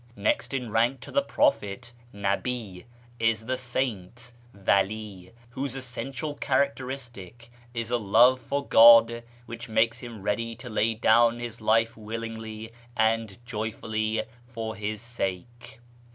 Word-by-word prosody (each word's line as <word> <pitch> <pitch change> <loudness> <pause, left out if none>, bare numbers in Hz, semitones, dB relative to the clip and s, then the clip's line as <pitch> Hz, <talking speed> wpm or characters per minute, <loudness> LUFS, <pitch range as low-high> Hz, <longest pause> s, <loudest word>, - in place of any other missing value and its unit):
Next 105 +1 0
in 125 -5 -3
rank 120 +4 +2
to - - -10
the 280 - +3
prophet 120 - 0 0.2
(nabi) 100 0 -3 0.3
is 115 -1 +1
the 130 +2 -1
saint 120 -2 -4 0.2
(vali), 100 -1 -1 0.2
whose 135 +1 -4
essential 135 +3 -5
characteristic 130 - -3 0.2
is 115 0 -3
a 120 - +2
love 120 +5 +5
for 140 +3 -3
God 115 0 +8 0.2
which 115 0 -8
makes 115 +1 +2
him 115 -5 -9
ready 115 +3 -1
to 125 0 -10
lay 115 +1 +1
down 115 +1 +4
his 120 -1 -7
life 115 +1 +2
willingly 110 0 -7 0.2
and 110 -2 +1
joyfully 110 -1 -2 0.2
for 115 -2 -5
His 105 +2 -4
sake. 120 0 -5
115 Hz, 125 wpm, -27 LUFS, 110-120 Hz, 0.3 s, God